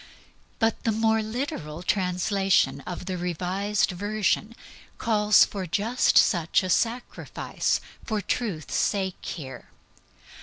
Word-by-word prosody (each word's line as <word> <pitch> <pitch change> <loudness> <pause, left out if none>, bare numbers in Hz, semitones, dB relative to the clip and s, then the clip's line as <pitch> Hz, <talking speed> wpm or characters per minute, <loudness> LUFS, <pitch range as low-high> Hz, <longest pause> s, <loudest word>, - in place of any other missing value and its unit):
But 225 -1 0
the 225 - +2
more 220 0 +2
literal 215 - -4
translation 180 -6 +1
of 180 0 -5
the 185 -1 -3
Revised 185 +4 0
Version 210 +3 -1 0.4
calls 210 -2 +4
for 190 -3 -5
just 220 +9 +2
such 170 -1 +4
a 185 - -1
sacrifice 235 +6 -1 0.2
for 215 -4 -2
truth's 195 -5 -3
sake 190 -3 0
here. 130 -6 -7
200 Hz, 110 wpm, -26 LUFS, 180-220 Hz, 0.4 s, calls